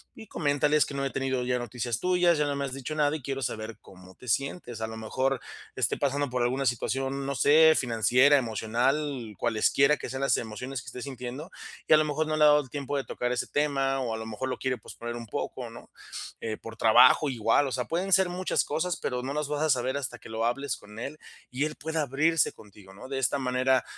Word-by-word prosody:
y 220 - -11
coméntale: 145 -3 +1
"Es 150 - +4
que - - -8
no 140 0 -2
he 135 - 0
tenido 135 -1 -1
ya 125 0 0
noticias 120 -1 -3
tuyas, 180 -2 +3
ya 150 - +2
no 145 -1 -1
me 140 - -2
has 135 -2 -4
dicho 135 +3 -5
nada, 150 -1 +2
y - - -13
quiero 135 +1 -4
saber 110 -3 -4
cómo 95 0 -15
te 125 - -10
sientes", 130 - -2
a 110 - -2
lo 110 - -7
mejor, 130 +4 -1 0.3
esté - - 0
pasando 140 0 0
por 125 -1 0
alguna 130 +3 0
situación, 135 +3 -1
no 140 0 -2
sé, 160 +4 +6
financiera, 125 +4 +4
emocional, 120 +1 -1
cualesquiera 135 +6 +3
que - - -6
sean 130 0 -4
las 135 - +3
emociones 120 +4 -5
que - - -17
esté 125 - -7
sintiendo, 130 +5 -7 0.4
y - - +6
a - - +9
lo 155 - +3
mejor 150 +1 -1
no 155 0 -1
le 150 - +4
ha - - +8
dado 150 0 +6
el 130 - -13
tiempo 145 +1 -4
de 140 - 0
tocar 125 -1 -3
ese 125 - -2
tema 135 -2 0
o 120 -3 -2
a - - -3
lo 110 - -6
mejor 115 +4 -4
lo 130 - -2
quiere 130 -1 0
posponer 120 +2 -7
un 120 -1 -6
poco, - - -4
¿no?, - - -12 0.5
eh, 110 -1 -4
por 115 0 -10
trabajo, 125 +6 +6
igual, 115 +2 +2
o - - -4
sea, 125 -1 -2
pueden 185 +3 -1
ser 190 0 +5
muchas 180 +1 0
cosas, 175 +2 -1
pero 125 0 -2
no 135 - -3
las 150 0 -1
vas 150 +1 -2
a 155 - +1
saber 130 +1 0
hasta 135 -4 -5
que - - -13
lo 110 +1 -1
hables 135 +2 -1
con 105 +2 -12
él 140 +5 -5 0.3
y 130 +4 0
él 155 0 -4
pueda 160 +1 -2
abrirse 150 +3 +2
contigo, 100 -2 -16
¿no?, 105 +7 -11
de 135 - -3
esta 135 +2 +1
manera, 130 0 +2
135 Hz, 245 wpm, -28 LUFS, 120-145 Hz, 0.5 s, a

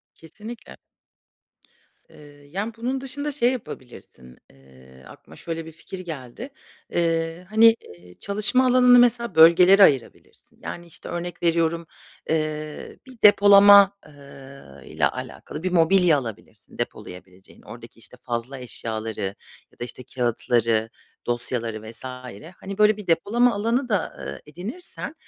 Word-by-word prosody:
Kesinlikle. 215 +9 -12 1.3
Eee, 150 - -16 0.2
yani, 205 +7 -4
bunun 250 +3 -3
dışında 285 +3 -5
şey 255 -3 +1
yapabilirsin, 120 - -10
eee, 65 -1 -19
aklıma 80 +2 -16
şöyle 165 -1 -6
bir 160 - -10
fikir 170 +4 -10
geldi. 165 - -8 0.4
Eee, 165 +1 -1
hani, 225 +1 +6
eee, 90 0 -16
çalışma 210 - 0
alanını 250 -1 +6
mesela 235 -5 +2
bölgelere 175 +5 +7
ayırabilirsin. 135 -10 0
Yani, 175 0 -7
işte, 170 - -12
örnek 175 0 -6
veriyorum, 165 -1 0 0.4
eee, 155 -1 -4
bir 255 -3 -16
depolama, 200 -1 +7
eee, 150 - -17 0.7
ile - - -1
alakalı 150 - -8
bir 185 -1 -2
mobilya 170 -1 +4
alabilirsin 115 -5 -10
depolayabileceğin. 90 +1 -9
Oradaki, 115 -1 -13
işte, 115 +2 -13
fazla 120 +2 -5
eşyaları 115 -3 -5 0.5
ya - - -27
da, 120 - -3
işte, 125 - -8
kâğıtları, 115 -2 0 0.4
dosyaları 115 -2 -2
vs. 115 - -10 0.6
hani, 195 +1 -8
böyle 210 0 +4
bir 210 - -10
depolama 225 +9 +2
alanı 230 +5 -1
da, 205 -6 -2
eee, - - -8
edinirsen 215 - -7
165 Hz, 125 wpm, -23 LUFS, -, 1.3 s, bölgelere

